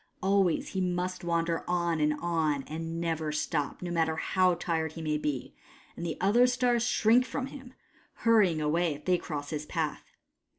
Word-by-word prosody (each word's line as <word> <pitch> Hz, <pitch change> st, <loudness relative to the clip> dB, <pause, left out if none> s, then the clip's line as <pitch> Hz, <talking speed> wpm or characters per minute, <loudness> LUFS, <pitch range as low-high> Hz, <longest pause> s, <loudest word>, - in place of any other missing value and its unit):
Always 195 Hz, -3 st, +2 dB
he 190 Hz, -, -2 dB
must 180 Hz, 0 st, -2 dB
wander 170 Hz, -1 st, 0 dB
on 170 Hz, -2 st, 0 dB
and 150 Hz, 0 st, +2 dB
on, 160 Hz, -5 st, 0 dB
and 165 Hz, +3 st, -5 dB
never 160 Hz, -2 st, -1 dB
stop, 150 Hz, +1 st, -2 dB
no 175 Hz, -, -3 dB
matter 160 Hz, -2 st, +1 dB
how 185 Hz, +2 st, +2 dB
tired 160 Hz, -2 st, -2 dB
he 165 Hz, -, -7 dB
may 150 Hz, -1 st, 0 dB
be; 145 Hz, -4 st, -3 dB, 0.4 s
and -, -, -7 dB
the 165 Hz, -2 st, -3 dB
other 225 Hz, +7 st, +4 dB
stars 245 Hz, -1 st, +2 dB
shrink 230 Hz, +3 st, +4 dB
from 255 Hz, +2 st, -4 dB
him, 265 Hz, -2 st, -11 dB, 0.5 s
hurrying 205 Hz, -8 st, +4 dB
away 155 Hz, +1 st, +1 dB
if 145 Hz, -, -14 dB
they 180 Hz, -1 st, +3 dB
cross 145 Hz, -3 st, -5 dB
his 150 Hz, -1 st, -4 dB
path. 160 Hz, -4 st, -3 dB
170 Hz, 175 wpm, -29 LUFS, 155-185 Hz, 0.5 s, other